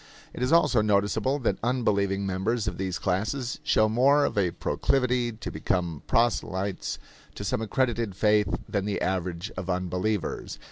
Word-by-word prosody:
It - - -7
is 125 +3 +1
also 150 -8 +4
noticeable 105 +5 +1
that 120 - 0
unbelieving 100 -5 +1
members 100 +4 -1
of - - -3
these 95 -2 -2
classes 105 +8 -2
show 110 - +3
more 135 +6 +4
of - - -2
a 95 -4 +2
proclivity 125 +5 0
to 110 - -7
become 85 -5 -1
proselytes 100 -5 0 0.4
to - - -6
some - - -1
accredited 115 -3 0
faith 105 +1 +3 0.2
than 100 -2 -1
the 105 -1 -1
average 90 +1 -2
of 90 0 -5
unbelievers. 90 +2 -2
105 Hz, 150 wpm, -27 LUFS, 95-120 Hz, 0.4 s, also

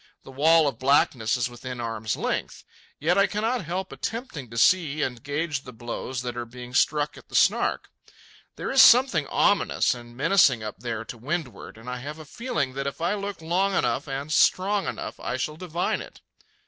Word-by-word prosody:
The - - -12
wall 155 +3 +4
of 135 -5 -3
blackness 130 -4 +2
is 120 - 0
within 125 +1 -8
arm's 110 -2 -3
length. - - -3 0.4
Yet 170 +6 +2
I 200 - +5
cannot 220 0 -1
help 185 +3 -4
attempting 225 - -5
to 115 - -8
see 155 +2 +3
and 125 -2 -3
gauge 145 0 -2
the 125 - -11
blows 120 +2 -5
that 120 -1 -4
are 120 -1 -5
being 125 +1 -10
struck 150 +2 +1
at - - -20
the - - -8
Snark. - - +2 0.7
There - - -4
is 270 0 +7
something 235 - +6
ominous - - +2
and 120 -1 -12
menacing 140 - +4
up 105 -1 -6
there 115 -2 -4
to 115 - -9
windward, 145 -2 -5
and 115 +2 -14
I 125 0 -3
have 145 +5 -7
a 155 - -10
feeling 155 - -3
that 135 +1 -3
if 140 - -5
I 170 +4 0
look 200 -4 -5
long 185 +4 +1
enough - - 0
and 140 +2 -4
strong 195 +4 +3
enough, - - -5
I - - -3
shall 150 +3 -3
divine 175 0 -2
it. - - -12
145 Hz, 195 wpm, -25 LUFS, 125-175 Hz, 0.7 s, is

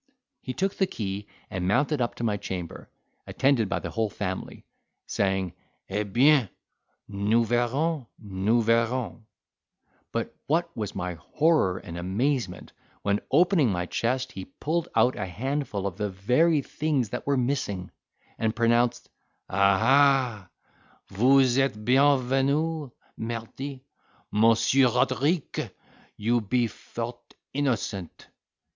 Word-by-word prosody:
He 130 - -5
took 195 +7 0
the 190 - +1
key 100 - -4 0.2
and 90 -1 -2
mounted 145 +7 +2
up 120 - -1
to - - -6
my 110 -3 +1
chamber, 90 -4 -6 0.4
attended 130 -7 +2
by - - 0
the - - -5
whole 110 -2 0
family, 95 -2 -5 0.4
saying, 95 -3 -1 0.4
"Eh 100 +2 -1
bien, 125 +3 +4 0.6
nous 105 +3 +1
verrons—nous 120 - 0
verrons." 115 +1 +1 0.9
But - - -3
what 165 +4 0
was 105 -2 -4
my 90 -1 -3
horror 150 - +2
and 85 -2 -7
amazement, 100 +1 -2 0.3
when, 100 +1 +1
opening 165 - +4
my 90 -1 -1
chest, 130 +7 -1
he 95 -4 -7
pulled 165 +4 -2
out 125 +1 +4
a 95 - -3
handful 120 - -3
of 95 -2 -3
the 105 -1 -1
very 130 - +2
things 145 -7 -1
that 125 - -5
were 140 -1 +2
missing, 120 -8 -2 0.5
and 110 0 0
pronounced, 120 0 +2 0.4
"Ah, 100 +1 +4
ha, 130 -5 +3 0.6
vous 130 +4 +4
etes 135 -6 +1
bienvenu—mardy, 135 0 0 0.5
Mons. 115 +1 +4
Roderique, 135 +4 +2 0.5
you 115 +3 +1
be 120 +4 +1
fort 120 +2 -7 0.2
innocent!" 115 - -2
120 Hz, 120 wpm, -26 LUFS, 100-135 Hz, 0.9 s, bien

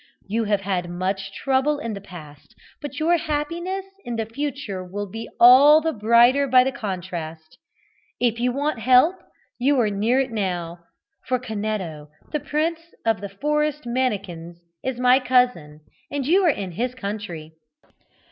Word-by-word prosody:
You 225 +3 -1
have 205 -1 +1
had 185 -3 -2
much 190 +2 -3
trouble 270 +6 0
in 230 -6 -4
the 200 - -7
past, 175 0 -13 0.3
but 290 - -7
your 335 +2 +3
happiness 335 +5 -3 0.2
in 240 - -4
the 225 -1 -2
future 230 -5 -4
will 200 +3 -5
be 225 +4 -7
all 275 +6 +8
the 320 0 -1
brighter 235 +6 +4
by 255 -1 +6
the 265 - -1
contrast. 175 -8 -6 0.6
If 235 -2 +1
you 250 +1 +1
want 285 0 -2
help, 255 - +4 0.4
you 270 +2 +2
are 215 -3 +2
near 220 +6 +1
it 265 -2 -1
now, 175 -5 -3 0.5
for 255 +1 +1
Canetto, 210 -10 -4 0.2
the 300 - -1
Prince 315 +4 -1 0.3
of 225 -4 +1
the 200 - -5
Forest 300 +6 -1
Mannikins, 200 -9 -3 0.3
is 260 -2 -3
my 250 +1 +5
cousin, 250 - +1 0.3
and 285 -2 -3
you 370 +7 +3
are - - +5
in 200 - -2
his 245 +8 -3
country." 200 -8 -6
230 Hz, 155 wpm, -23 LUFS, 195-275 Hz, 0.6 s, all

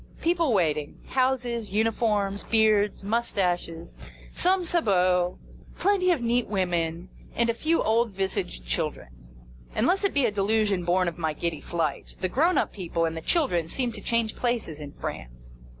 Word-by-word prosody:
People 335 -4 +1
waiting. 155 -7 0
Houses, 250 -4 0
uniforms, 210 -2 0
beards, 215 -2 +2
moustaches, 180 - -1 0.4
some 370 0 +2
sabots, 185 - +2 0.4
plenty 385 -2 +2
of 320 -9 +2
neat 240 0 +1
women, 175 -3 -1 0.3
and 235 0 +2
a - - -4
few 315 +8 +1
old 230 +2 +2
visaged 185 - -3
children. - - -2 0.7
Unless 365 - +2
it 395 - +1
be 280 -3 +3
a 225 - +1
delusion 205 -2 +1
born 180 +1 +2
of 170 0 -4
my 160 -2 -1
giddy 160 -1 -3
flight, 160 -4 -3
the 185 - -1
grown 330 - +2
up - - +1
people 170 -3 -1
and 165 0 -2
the 165 - -5
children 175 - +1
seem 245 +7 -1
to 215 -2 -8
change 230 -1 0
places 235 -11 -2
in 145 -1 -8
France. - - -8
205 Hz, 155 wpm, -26 LUFS, 170-240 Hz, 0.7 s, be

